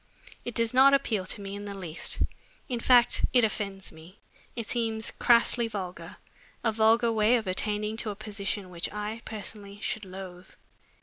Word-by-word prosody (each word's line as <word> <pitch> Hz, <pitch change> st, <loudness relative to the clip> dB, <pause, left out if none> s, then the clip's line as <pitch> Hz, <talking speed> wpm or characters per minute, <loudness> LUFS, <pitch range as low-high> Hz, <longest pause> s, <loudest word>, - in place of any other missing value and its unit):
It 240 Hz, -, -6 dB
does 230 Hz, 0 st, +1 dB
not 270 Hz, +2 st, +7 dB
appeal 215 Hz, -9 st, -1 dB
to 205 Hz, -, +1 dB
me 195 Hz, 0 st, -6 dB
in 205 Hz, 0 st, -6 dB
the 200 Hz, -1 st, -6 dB
least 170 Hz, -4 st, -3 dB, 0.5 s
in 245 Hz, -3 st, -2 dB
fact 245 Hz, 0 st, +5 dB
it 245 Hz, -2 st, +5 dB
offends 200 Hz, -3 st, -2 dB
me. 165 Hz, +5 st, -15 dB, 0.4 s
It 230 Hz, -, -4 dB
seems 225 Hz, -2 st, -1 dB
crassly 235 Hz, 0 st, +4 dB
vulgar, 190 Hz, -5 st, -6 dB, 0.5 s
a 225 Hz, -, +2 dB
vulgar 225 Hz, +2 st, +4 dB
way 220 Hz, +2 st, +4 dB
of 225 Hz, -, -4 dB
attaining 210 Hz, +3 st, -1 dB
to 225 Hz, -, 0 dB
a 205 Hz, -, -4 dB
position 200 Hz, -2 st, -4 dB
which 170 Hz, -1 st, -3 dB
I, 210 Hz, +2 st, -4 dB
personally, 205 Hz, -1 st, -8 dB
should 215 Hz, -, -2 dB
loathe." 185 Hz, -1 st, -9 dB
215 Hz, 170 wpm, -28 LUFS, 195-230 Hz, 0.5 s, not